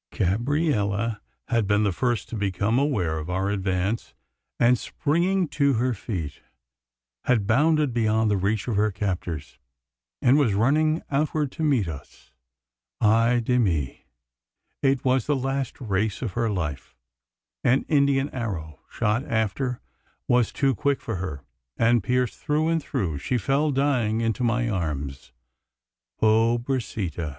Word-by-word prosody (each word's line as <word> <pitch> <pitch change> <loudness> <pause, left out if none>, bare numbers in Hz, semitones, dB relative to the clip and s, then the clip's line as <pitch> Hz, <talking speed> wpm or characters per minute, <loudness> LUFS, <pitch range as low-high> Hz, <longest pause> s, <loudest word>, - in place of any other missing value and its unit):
Gabriella 115 - 0 0.3
had 115 -4 +1
been 105 +1 +3
the 100 - +2
first 120 +5 -1
to - - -5
become 100 +3 0
aware 95 - 0
of 80 +3 -7
our 95 +2 0
advance; 95 +2 -2 0.4
and, 120 +1 +5
springing 175 +4 0
to 140 -1 +2
her 125 +2 +1
feet, 90 - -5 0.8
had 115 -5 +2
bounded 150 +4 +3
beyond 110 -2 +2
the - - +3
reach 100 +3 -1
of 115 - -1
her 105 +1 +3
captors, 90 -6 -4 0.6
and 130 - +4
was 115 -9 +2
running 155 +8 +2
outward 150 0 0
to - - -8
meet 135 - +2
us. 70 -5 -10 0.7
Ay 115 +3 +3
de 125 +2 +2
mi! 80 - -1 0.8
it 135 -2 +1
was 130 -1 +2
the 145 - +2
last 135 0 -2
race 105 -1 -1
of 110 -7 -3
her 115 +1 0
life. 80 -8 -4 0.7
An 130 +3 +3
Indian 140 -2 +2
arrow 85 - -5
shot 105 +5 0
after 120 +3 -1 0.5
was 125 -1 +3
too 135 -2 +1
quick 140 +1 0
for 115 -5 -4
her; 80 -7 -5 0.3
and, 115 0 +3
pierced 125 +3 0
through 155 +2 0
and 165 -1 +1
through, 90 - -2
she 125 - -1
fell 135 +7 +1
dying 130 -6 +1
into 115 +2 -1
my 120 0 +1
arms. 75 - -3 0.9
Pobrecita! 110 - +1
115 Hz, 140 wpm, -25 LUFS, 100-135 Hz, 0.9 s, and